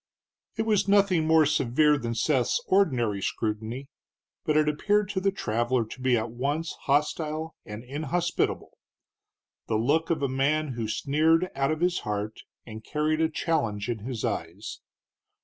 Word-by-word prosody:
It 220 - 0
was 210 -3 +2
nothing 195 -5 +3
more 160 -1 +5
severe 150 +1 +3
than 115 -4 -3
Seth's 125 +1 +1
ordinary 120 - +2
scrutiny, 110 +6 -3 0.6
but 155 -1 +1
it 155 0 +3
appeared 205 +7 +1
to 200 -2 -1
the 195 +1 +2
traveler 120 - 0
to 120 +4 -10
be 130 -1 +3
at 110 +1 -3
once 145 +7 -2
hostile 155 +2 0
and 105 +2 -7
inhospitable, 155 +6 -2 0.9
the 110 - 0
look 145 +9 +1
of 155 -4 0
a - - +3
man 145 +4 +1
who 120 -3 -3
sneered 160 +9 +2
out 135 0 0
of 155 +1 -2
his 180 0 +2
heart 105 +1 -4 0.3
and 110 -1 -9
carried 155 +3 0
a 160 - +3
challenge 115 -11 -1
in 115 -2 -2
his 120 +2 -4
eyes. 100 -2 -4
140 Hz, 155 wpm, -27 LUFS, 115-160 Hz, 0.9 s, more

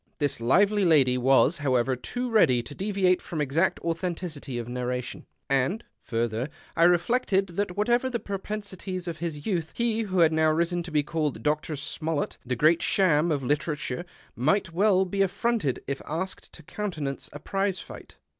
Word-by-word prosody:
This 145 -6 -1
lively 200 - +3
lady 145 -7 +5
was, 135 +6 +4
however, 130 -2 +1
too 245 - -4
ready 160 - +4
to 145 - -9
deviate 190 0 +1
from 165 - -5
exact 150 +5 +1
authenticity 165 -5 -3
of 120 -1 -4
narration; 125 0 -4 0.2
and, 135 - +1 0.2
further, 115 +2 -2 0.3
I 165 - +5
reflected 195 +2 +2
that, 180 +1 -3
whatever 240 +5 +2
the 240 -2 -2
propensities 195 -2 -5
of 165 -2 -4
his 155 -3 -4
youth, 170 -6 -2
he 230 -1 +1
who 190 -5 0
had 160 -1 +5
now 160 0 +3
risen 170 +2 +1
to 170 0 -8
be 150 -1 +2
called 155 -2 -1
by - - -10
Dr. 150 +1 -1
Smollett 150 +2 -3
the 125 0 -2
Great 155 +7 +4
Cham 170 -4 +2
of 140 -3 -1
literature 150 +1 -1 0.3
might 165 - +1
well 190 +1 +3
be 195 +2 -1
affronted 195 - 0
if 140 0 -4
asked 175 +5 -4
to 165 - -12
countenance 155 -7 -4
a - - -7
prize 195 +4 -1
fight. - - -11
165 Hz, 170 wpm, -27 LUFS, 145-195 Hz, 0.3 s, lady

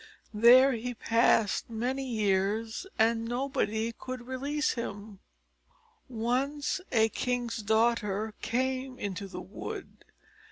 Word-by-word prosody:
There 245 +5 +7
he 245 0 -3
passed 225 -2 +2
many 250 +4 -2
years, 215 - 0
and 225 +1 +3
nobody 235 -2 -1
could 255 +1 -7
release 280 +4 -1
him. 205 -4 -6 0.9
Once 260 +8 -1
a 225 -2 +4
king's 245 0 -2
daughter 220 -1 +1
came 260 +2 -1
into 200 -2 -4
the 190 - -7
wood. 400 - -8
235 Hz, 105 wpm, -29 LUFS, 220-255 Hz, 0.9 s, There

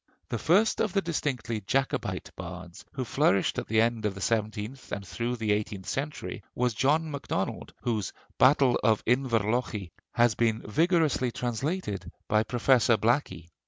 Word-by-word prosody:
The 120 - -2
first 200 - +3
of 215 -4 0
the 195 - +2
distinctively 125 -9 -2
Jacobite 135 +7 -1
bards, 90 0 -9
who 130 -2 -3
flourished 110 -6 +2
at - - -6
the 110 0 +2
end 115 -1 +2
of 105 -2 -1
the - - -7
seventeenth 110 +4 -2
and 100 -1 -4
through 120 +4 -2
the 110 -3 -1
eighteenth 105 -2 -2
century, 145 +2 -4
was 125 -1 +1
John 150 +7 +1
MacDonald, 130 -9 -3
whose 110 -6 -1 0.3
'Battle 130 -1 +5
of 110 -2 +3
Inverlochy' 115 - 0 0.2
has 120 -2 +4
been 115 -1 0
vigorously 155 - +2
translated 120 - -3 0.2
by 110 0 +3
Professor 120 0 +3
Blackie. 110 - 0
120 Hz, 150 wpm, -28 LUFS, 105-135 Hz, 0.3 s, Battle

